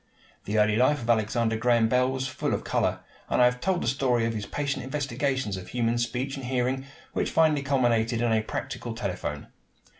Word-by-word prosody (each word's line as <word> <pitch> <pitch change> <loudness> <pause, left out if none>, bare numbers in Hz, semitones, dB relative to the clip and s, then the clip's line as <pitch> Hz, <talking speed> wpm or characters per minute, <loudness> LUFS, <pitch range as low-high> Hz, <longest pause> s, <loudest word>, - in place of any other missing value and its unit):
The 105 +2 -1
early 105 0 +3
life 130 +2 +3
of 115 - -6
Alexander 110 0 +1
Graham 115 0 +3
Bell 125 +2 +2
was 130 0 -2
full 130 - -1
of - - -5
color, - - 0 0.3
and - - +1
I 125 - +7
have 125 0 +1
told 190 -2 0
the - - -2
story 125 -2 +1
of 115 - -1
his 105 -2 -4
patient 140 -3 -2
investigations 130 -5 -2
of 90 0 -8
human 120 -1 0
speech 125 +3 -2
and 135 - -6
hearing, 130 +1 -1 0.3
which, - - 0
finally 155 -3 +3
culminated 120 -4 +1
in 120 -1 +1
a 110 - +3
practical 115 +1 -5
telephone. 90 -9 -4
120 Hz, 200 wpm, -27 LUFS, 115-130 Hz, 0.3 s, I